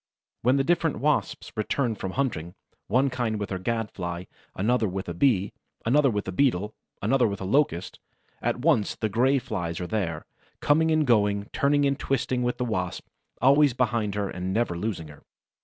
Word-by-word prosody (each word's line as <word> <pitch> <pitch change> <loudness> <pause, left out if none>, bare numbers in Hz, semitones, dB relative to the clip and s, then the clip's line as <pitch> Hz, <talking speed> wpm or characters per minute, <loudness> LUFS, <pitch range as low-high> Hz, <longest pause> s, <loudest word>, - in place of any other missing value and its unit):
When 125 +3 +3
the 135 - +2
different 165 0 +1
Wasps 150 0 0
return 115 +3 0
from 95 -3 -5
hunting, 90 - -2 0.3
one 130 +5 +2
kind 120 -4 -1
with 105 - -4
her 95 - -2
Gad 115 +2 -2
fly, 85 -1 -5 0.3
another 110 +3 +1
with 95 +1 -4
a 85 - -3
Bee, 100 -1 +2 0.3
another 140 +4 +4
with 105 -3 -2
a - - -2
Beetle, 105 -2 +1 0.3
another 130 -3 +3
with 100 -2 -4
a - - -5
Locust, 95 - 0 0.4
at - - -1
once 130 -9 +2
the 110 - -2
Gray 130 +6 +3
Flies 85 -9 -3
are 90 - -3
there, 90 -6 -2 0.3
coming 160 +2 +3
and 155 -1 +3
going, 105 -4 +2
turning 145 0 +2
and 140 0 +1
twisting 130 -1 -1
with 125 0 -1
the 125 - -1
Wasp, 90 -6 -3 0.4
always 140 -1 +5
behind 115 -5 0
her 100 -1 -1
and 90 0 -4
never 110 -3 0
losing 90 -3 -3
her. 75 - -14
115 Hz, 185 wpm, -26 LUFS, 95-135 Hz, 0.4 s, always